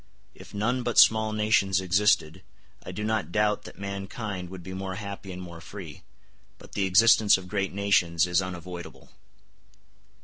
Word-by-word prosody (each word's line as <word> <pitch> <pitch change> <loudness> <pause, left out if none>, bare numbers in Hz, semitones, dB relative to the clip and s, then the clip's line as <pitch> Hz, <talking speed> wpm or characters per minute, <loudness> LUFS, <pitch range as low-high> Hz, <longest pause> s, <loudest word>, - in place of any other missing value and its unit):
If - - -14
none 115 +5 -1
but 120 -1 -3
small 110 -1 +6
nations 105 -3 +2
existed, 95 -2 +1 0.4
I - - -7
do 105 - -5
not 110 -4 -1
doubt 105 +2 +1
that - - -11
mankind 100 -1 -5
would 95 -1 -9
be 95 - -8
more 95 0 -5
happy 100 -1 -7
and 90 - -7
more 85 -2 -9
free; 85 -2 -10 0.6
but - - -16
the 100 - -1
existence 110 +2 +5
of 95 -1 -10
great 95 0 -2
nations 90 -4 +2
is 90 +1 +1
unavoidable. 90 -1 -8
95 Hz, 160 wpm, -26 LUFS, 90-105 Hz, 0.6 s, small